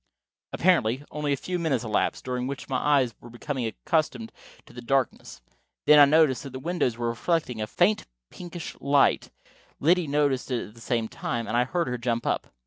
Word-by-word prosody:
Apparently 140 -8 +2
only 150 -1 -2
a 140 - +1
few 180 +5 -3
minutes 140 -8 0
elapsed, 110 -2 -1
during 125 0 -2
which 140 0 -6
my 130 - -1
eyes 135 -5 +2
were 120 - -12
becoming 120 +1 -4
accustomed 115 - -1 0.3
to - - -17
the 120 - -8
darkness. 125 - -1 0.4
Then 150 0 +7
I 145 - +10
noticed 145 -4 +3
that 135 -2 -9
the 130 - -5
windows 150 -6 -1
were 120 -1 -1
reflecting 125 -1 -1
a 105 - -2
faint 185 - +1 0.2
pinkish 175 -1 -8
light, 140 0 +2 0.5
Liddy 175 +2 +3
noticed 140 -3 0
it 125 -5 -2
at - - -18
the 115 - -16
same 115 -1 -1
time, 115 +1 -4
and 115 - -2
I 120 +1 +3
heard 170 +5 -1
her 125 0 -3
jump 120 -1 -1
up. - - -1
130 Hz, 195 wpm, -26 LUFS, 120-150 Hz, 0.5 s, I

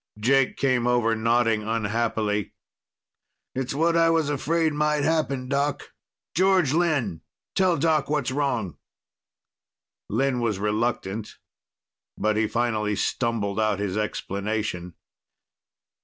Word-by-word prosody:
Jake 135 +4 +2
came 130 -3 +1
over, 120 -2 +2
nodding 115 0 +2
unhappily. 110 -2 -1 1.0
"It's 130 +1 -3
what 165 +3 +2
I 165 0 +4
was 160 -3 +2
afraid 160 +2 +1
might 150 0 +1
happen, 145 -5 0
Doc. 140 +2 -1 0.4
George 185 -6 +3
Lynn! 145 - 0 0.3
Tell 185 -3 +2
Doc 155 -1 +1
what's 145 -4 0
wrong." 130 - -1 1.3
Lynn 130 +3 +1
was 115 -4 0
reluctant, 105 0 -2 0.8
but 110 0 +1
he 110 0 +2
finally 110 -3 0
stumbled 110 -3 -1
out 110 -2 +1
his 100 -2 -2
explanation. 100 -3 -3
120 Hz, 110 wpm, -25 LUFS, 105-145 Hz, 1.3 s, I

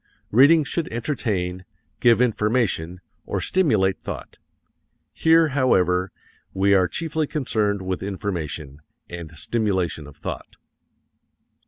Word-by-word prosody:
Reading 145 +8 +6
should 165 +3 -3
entertain, 105 -8 -2 0.4
give 120 0 +5
information, 105 -7 0 0.3
or - - -2
stimulate 110 - +1
thought. - - -7 0.7
Here, 165 0 +4
however, 95 -10 +2 0.4
we 100 +1 +3
are 95 -2 +4
chiefly 160 - -2
concerned 105 -9 -1
with 95 0 -3
information, 85 -8 -4 0.3
and 85 -2 -7
stimulation 95 -8 -1
of 75 - -14
thought. - - -7
100 Hz, 105 wpm, -23 LUFS, 90-130 Hz, 0.7 s, Reading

